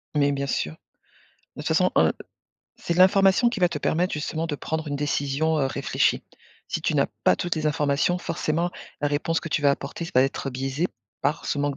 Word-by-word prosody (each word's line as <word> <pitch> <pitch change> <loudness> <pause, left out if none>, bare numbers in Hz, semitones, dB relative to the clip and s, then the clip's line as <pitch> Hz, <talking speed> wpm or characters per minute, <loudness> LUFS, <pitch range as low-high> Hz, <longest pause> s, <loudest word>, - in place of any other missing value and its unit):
Mais 145 -1 +3
bien 140 0 -2
sûr. 80 - -1 0.8
De - - -6
toute - - -5
façon, - - +3
heu, - - +4 0.6
c'est 170 - -2
l'information 195 +5 +5
qui 235 -5 -4
va 180 - +5
te 155 - -4
permettre 175 +5 0
justement 160 +2 -2
de 145 -2 -3
prendre 160 +1 -3
une 145 - -2
décision, 145 +2 0
heu, 135 - +2
réfléchie. - - 0 0.5
Si - - -2
tu - - 0
n'as - - +3 0.2
pas 90 - +5
toutes 175 -1 -1
les 155 -1 -1
informations, 150 +3 +1
forcément 165 0 -1 0.3
la 145 - +1
réponse 160 +3 0
que 170 - -6
tu 145 - 0
vas 140 - +5
apporter 140 +4 -3
ça 165 - -7
va 130 - +6
être 135 0 -2
biaisé 135 +6 -1 0.4
par 145 +3 -1
ce 145 - -1
manque 145 -1 -1
150 Hz, 210 wpm, -25 LUFS, 140-170 Hz, 0.8 s, va